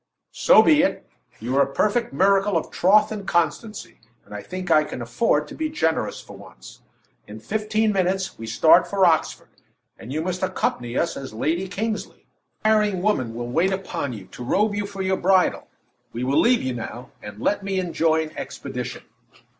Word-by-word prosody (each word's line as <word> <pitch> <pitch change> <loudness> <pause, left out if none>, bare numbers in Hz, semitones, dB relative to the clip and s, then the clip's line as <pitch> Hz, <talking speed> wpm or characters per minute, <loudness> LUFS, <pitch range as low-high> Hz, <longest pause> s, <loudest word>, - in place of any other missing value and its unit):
"So - - +6
be 300 -2 +5
it! 285 - -1 0.3
You 120 +4 -3
are - - +5
a 140 - +1
perfect 215 - 0
miracle 195 +5 +3
of 160 - -4
troth 210 +4 +4
and 205 -3 -6
constancy, 170 - -2 0.3
and - - -13
I 105 - -5
think 185 - -6
I 155 - +5
can 150 - -7
afford 150 - 0
to - - -9
be 315 -1 -3
generous 160 - -1
for - - -12
once. - - -14 0.5
In 105 +1 -9
fifteen 215 - 0
minutes, 190 0 0
we 115 - -7
start 165 +9 +5
for 195 -2 +2
Oxford, 165 -2 +1 0.5
and 120 - -9
you 155 +3 -2
must 185 +1 -3
accompany 120 -9 -2
us 170 - 0
as 130 -5 -8
Lady 165 +10 -1
Kingsley. 215 +3 -4 0.4
A - - +5
tiring 210 -4 +2
woman 130 - 0
will 120 0 -5
wait 175 +8 +2
upon 190 -7 -3
you 100 -4 -9
to 125 - -8
robe 205 - +1
you 205 0 -2
for 195 -1 -5
your 190 0 0
bridal. 185 0 +2 0.5
We 120 - -4
will 135 +3 +2
leave 245 +1 +3
you 130 -1 -2
now, 120 +1 -7
and 105 0 -10
let 205 - 0
me 195 -1 -1
enjoin 160 -3 0
expedition." 125 -3 -6
180 Hz, 185 wpm, -23 LUFS, 130-205 Hz, 0.5 s, So